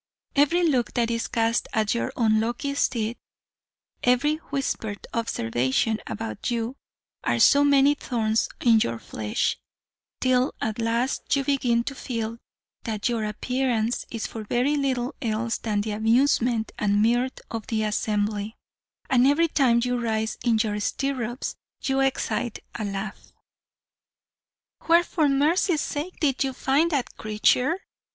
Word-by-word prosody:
Every 335 +5 +4
look 250 -7 0
that 235 -1 +1
is 230 0 -1
cast 230 0 +1
at 215 -1 +1
your 235 +2 -1
unlucky 230 +4 +1
steed 235 -4 0 0.8
every 270 +5 +3
whispered 225 -7 -3
observation 130 - 0
about 225 +1 -4
you 235 +1 -2 0.5
are - - +1
so 285 0 +6
many 285 0 +5
thorns 225 -6 0
in 230 -2 +5
your 115 - 0
flesh, 110 -1 -2 0.6
till 255 0 +2
at 220 +1 -2
last 235 +5 0
you 275 - 0
begin 250 -4 +1
to 275 - -4
feel 230 -3 -4 0.4
that 220 -1 -2
your 230 -2 -1
appearance 240 +1 -1
is 230 -2 -4
for 225 - -6
very 250 +7 +1
little 260 -3 -1
else 230 0 -1
than 210 -2 -1
the 215 +1 -3
amusement 230 +1 +2
and 205 0 +2
mirth 245 +3 +1
of 225 -2 -5
the 220 -1 0
assembly; 210 0 -1 0.5
and 255 -1 +4
every 315 +4 +4
time 245 -6 +3
you 245 0 0
rise 220 -1 -1
in 235 -2 +3
your 210 -1 -2
stirrups 250 +1 -2 0.3
you 270 0 +1
excite 265 -3 0 0.2
a 220 - -4
laugh. 195 0 -5 1.6
"'Where, 340 +1 +6
for 315 -4 +1
mercy's 305 +4 +2
sake, 305 +5 -4
did 280 -5 +1
you 265 -1 -2
find 275 +6 +2
that 280 -6 -2
creature?' 250 - +2
235 Hz, 140 wpm, -25 LUFS, 220-270 Hz, 1.6 s, so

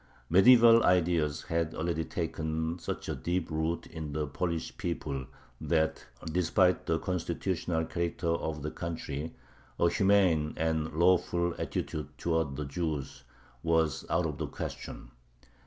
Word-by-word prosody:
Medieval 115 +4 +8
ideas 85 -4 +2
had 80 -1 -1
already 80 0 -1
taken 80 0 -3
such - - -5
deep 90 -1 -1
root 80 +2 -1
in 80 -3 -6
the 75 0 -1
Polish 85 +3 -3
people 70 -6 -3 0.3
that, 80 -3 0 0.2
despite 90 +2 +2
the 80 - +2
constitutional 85 -1 -2
character 85 +1 -2
of 80 -3 -2
the 75 - -3
country, 80 -2 -5 0.4
a 85 - +4
humane 95 -7 +3
and 80 -1 0
lawful 85 0 +3
attitude 75 -2 -3
towards 80 -5 0
the 75 - -3
Jews 70 -3 -4 0.4
was 80 -4 +1
out 90 - +2
of 75 -2 -3
the 80 - -2
question. - - -7
80 Hz, 125 wpm, -30 LUFS, 80-85 Hz, 0.4 s, Medieval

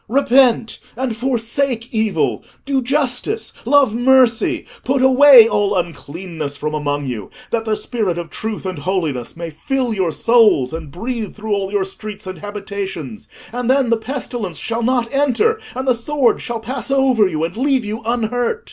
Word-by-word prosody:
Repent 250 -2 +3 0.2
and 255 -3 -2
forsake 240 0 -2
evil: 220 -2 0 0.2
do 275 -1 +1
justice: 275 - -1
love 280 -6 +4
mercy: 260 +6 +3 0.2
put 265 0 +1
away 260 -3 +8
all 205 -2 +1
uncleanness 165 -3 -4
from 150 +1 -3
among 145 -1 -2
you, 115 -6 -5 0.2
that 225 -1 -1
the 220 -1 0
spirit 210 -7 -2
of 170 -2 -6
truth 215 -2 -5
and 185 -4 -4
holiness 155 -7 -2
may 170 -1 -5
fill 250 - -2
your 185 -5 0
souls 210 - +3
and 160 -2 -6
breathe 225 - -5
through 215 0 -3
all 195 -1 -1
your 200 -2 0
streets 210 +1 -7
and 185 0 -7
habitations, 195 - -6 0.3
and 245 0 -2
then 260 -2 +3
the - - +5
pestilence 225 - -5
shall 230 +7 -3
not 245 0 +1
enter, 290 - +2 0.2
and 260 +1 -4
the 255 - +5
sword 250 +1 +1
shall 235 -1 -4
pass 250 +4 -4
over 265 -6 +3
you 160 -3 -2
and 170 +2 -3
leave 260 -1 +1
you 215 +2 -4
unhurt. 240 - -1
225 Hz, 165 wpm, -18 LUFS, 190-255 Hz, 0.3 s, away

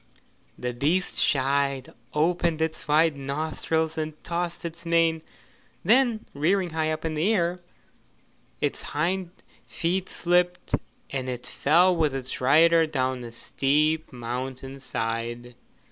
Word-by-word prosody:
The 125 0 -3
beast 155 +9 0
shied, 140 -1 +1 0.2
opened 170 +1 +1
its 160 +1 -2
wide 155 +1 +4
nostrils 155 +3 -2
and 155 0 -3
tossed 170 0 -3
its 170 0 -6
mane, 165 -1 +2 0.6
then 235 +1 +3
rearing 175 +5 +1
high 155 0 0
up 155 +1 -4
in 160 - -1
the 160 +8 +1
air, 180 -3 +1 1.0
its - - -1
hind 175 +4 -1 0.4
feet 180 +3 -1
slipped 180 0 +1 0.4
and 130 -2 -2
it 125 -1 -5
fell 175 +5 +3
with 155 -4 +1
its 130 -1 -4
rider 165 +5 +5
down 130 -4 -1
the 120 -1 -7
steep 150 +6 +1
mountain 130 +2 -5
side. 120 0 -3
155 Hz, 125 wpm, -26 LUFS, 135-170 Hz, 1.0 s, rider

